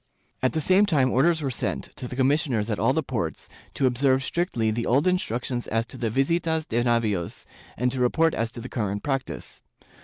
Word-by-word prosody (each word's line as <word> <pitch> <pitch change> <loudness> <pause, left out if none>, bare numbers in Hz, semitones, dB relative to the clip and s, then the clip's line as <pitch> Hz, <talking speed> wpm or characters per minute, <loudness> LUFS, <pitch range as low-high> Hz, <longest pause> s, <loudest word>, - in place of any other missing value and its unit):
^ - - -44 0.4
At 130 - +1
the 160 - 0
same 190 +6 +4
time 135 -8 +2
orders 160 +4 +3
were 135 - -1
sent, 120 - -3
to 125 - -5
the 125 - -7
commissioners 130 -5 +1
at 105 - -2
all - - +3
the - - 0
ports, - - -4 0.3
to 135 - +1
observe 130 +1 +2
strictly 130 - 0
the 115 +2 -2
old 135 +6 +3
instructions 125 - -1
as 115 +1 0
to 130 - -9
the 115 - 0
visitas 160 +6 0
de 120 +1 0
navios 110 -7 0 0.3
and 125 +2 +1
to 130 - -3
report 160 +6 +3
as 115 0 -1
to - - -6
the 125 - -6
current 105 -5 -3
practice. 135 -2 -4
130 Hz, 210 wpm, -25 LUFS, 115-150 Hz, 0.4 s, same